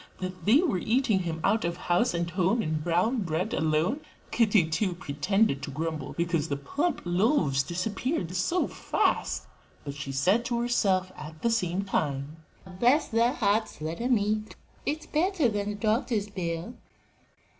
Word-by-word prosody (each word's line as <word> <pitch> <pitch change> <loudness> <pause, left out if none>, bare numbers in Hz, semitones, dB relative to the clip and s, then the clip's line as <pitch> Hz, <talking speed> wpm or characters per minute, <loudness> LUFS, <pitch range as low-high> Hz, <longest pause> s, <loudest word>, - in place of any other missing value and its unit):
that 185 -2 -6
they 225 +6 +6
were 260 - +1
eating 230 0 +2
him 165 -3 -3
out 220 +3 +2
of 170 0 -2
house 180 +7 +1
and 170 0 -1
home 185 +5 +1
in 155 0 -1
brown 175 +10 +1
bread 180 +4 -2
alone? 160 - +1 0.3
Kitty, 210 -7 +3
too, 180 +3 0
pretended 155 0 0
to 145 - -5
grumble 155 0 -4
because 170 -2 -1
the 140 - -1
plump 290 - -2
loaves 175 - +2
disappeared 185 - -2
so 335 - +1
fast, - - 0 0.4
but 140 - -5
she 145 -1 -6
said 185 - +2
to 240 -1 -1
herself 195 -6 +1
at 155 +1 -10
the 235 - +3
same 190 -4 0
time, 145 -5 -2 0.4
"Bless 275 +6 +4
their 235 +2 +3
hearts! 220 - 0
let 160 +5 -4
'em 245 0 +3
eat: 215 +1 -1 0.3
it's 310 +2 -2
better 335 -2 +1
than 205 -2 -1
a 210 - -3
doctor's 215 -1 0
bill." 170 +2 -4
185 Hz, 160 wpm, -28 LUFS, 165-230 Hz, 0.4 s, they